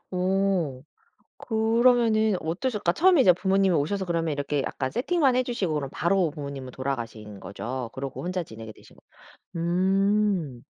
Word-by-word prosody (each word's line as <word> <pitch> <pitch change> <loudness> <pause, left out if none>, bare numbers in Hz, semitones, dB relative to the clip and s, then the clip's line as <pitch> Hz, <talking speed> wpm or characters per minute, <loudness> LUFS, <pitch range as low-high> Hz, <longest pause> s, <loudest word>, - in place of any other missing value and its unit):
어 185 -7 0 0.6
그러면은 225 -1 +3
어떠실까? 195 +2 -1
처음에 355 - +5
이제 185 -8 +7
부모님이 190 0 +2
오셔서 190 +7 -1
그러면 165 -2 -1
이렇게 145 0 -1
약간 130 -1 -3
세팅만 270 0 +1
해 255 - +2
주시고 220 -10 -2
그럼 145 -2 -2
바로 175 -1 +1
부모님은 140 -4 -7
돌아가신 115 -6 -5
거죠? 115 +6 -6
그러고 135 +2 -6
혼자 180 0 -2
지내게 110 -6 -10
되신 - - -19
거 - - -22 0.6
음. 190 - +1
180 Hz, 345 characters per minute, -26 LUFS, 140-210 Hz, 0.6 s, 이제